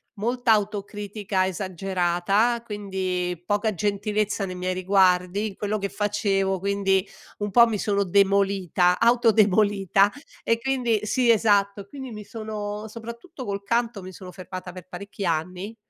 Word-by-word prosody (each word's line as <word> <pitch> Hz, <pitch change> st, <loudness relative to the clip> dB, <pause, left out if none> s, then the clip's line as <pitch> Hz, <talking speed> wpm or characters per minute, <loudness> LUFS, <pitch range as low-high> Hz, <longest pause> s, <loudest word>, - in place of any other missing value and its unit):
molta 240 Hz, +3 st, 0 dB
autocritica 205 Hz, -1 st, -2 dB
esagerata, 190 Hz, +4 st, 0 dB
quindi 185 Hz, -4 st, -3 dB
poca 205 Hz, +2 st, 0 dB
gentilezza 205 Hz, +1 st, -1 dB
nei 185 Hz, -, -6 dB
miei 185 Hz, 0 st, -2 dB
riguardi, 185 Hz, +1 st, +2 dB
in 200 Hz, -, -8 dB
quello 210 Hz, +1 st, -2 dB
che 200 Hz, 0 st, -2 dB
facevo, 200 Hz, -2 st, 0 dB
quindi 195 Hz, 0 st, +1 dB, 0.3 s
un 205 Hz, -1 st, -3 dB
po' 235 Hz, +2 st, +7 dB
mi 215 Hz, -2 st, -1 dB
sono 200 Hz, 0 st, +1 dB
demolita, 195 Hz, -2 st, +2 dB
auto 235 Hz, 0 st, +4 dB
demolita 200 Hz, -1 st, +3 dB, 0.3 s
e 230 Hz, 0 st, +1 dB
quindi 240 Hz, -5 st, 0 dB
Sì 245 Hz, +3 st, +1 dB
esatto, 200 Hz, -2 st, +2 dB
quindi 265 Hz, +1 st, -8 dB
mi 210 Hz, -1 st, -8 dB
sono 215 Hz, -1 st, -6 dB
soprattutto 235 Hz, -, -9 dB
col 200 Hz, 0 st, -4 dB
canto 235 Hz, -1 st, -1 dB
mi 185 Hz, -, -8 dB
sono 185 Hz, -1 st, -10 dB
fermata 185 Hz, 0 st, -8 dB
per 180 Hz, -1 st, -11 dB
parecchi 200 Hz, +2 st, -7 dB
anni, 180 Hz, +6 st, -2 dB
200 Hz, 140 wpm, -24 LUFS, 190-215 Hz, 0.3 s, po